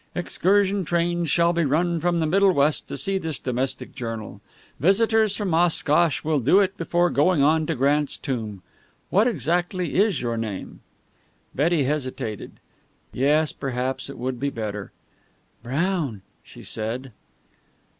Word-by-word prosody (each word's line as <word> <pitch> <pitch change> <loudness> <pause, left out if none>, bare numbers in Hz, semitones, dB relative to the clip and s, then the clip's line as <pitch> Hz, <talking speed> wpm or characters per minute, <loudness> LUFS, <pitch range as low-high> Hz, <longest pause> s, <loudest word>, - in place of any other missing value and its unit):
Excursion 195 +2 +1
trains 170 -1 0
will 170 0 +3
be 170 0 +1
run 165 +4 +1
from 175 +1 +1
the 160 - +1
Middle 195 +4 +4
West 145 0 +1
to - - -5
see 195 -1 -1
this 160 -5 -4
domestic 130 +1 -3
journal. 115 -5 -6 0.4
Visitors 215 - +3
from 200 -5 -2
Oshkosh 165 -2 +2
will 155 -1 +1
do 145 - +4
it 195 -1 +1
before 175 0 +1
going 150 +1 +3
on 155 +2 +3
to 165 - -1
Grant's 145 +3 +1
tomb. 110 -8 -4 0.5
What 210 +5 +4
exactly 175 - -1
is 200 -4 +2
your 120 -1 -2
name?" 110 -4 -5 0.7
Betty 155 +2 +2
hesitated. 130 -6 -3 0.6
Yes, 150 +4 +2
perhaps 130 0 -3
it 140 - -8
would 125 0 -3
be 140 +2 0
better. 105 -5 -5 0.7
"Brown," 140 - -2 0.2
she - - -14
said. 120 +4 -5
155 Hz, 140 wpm, -24 LUFS, 130-175 Hz, 0.7 s, Middle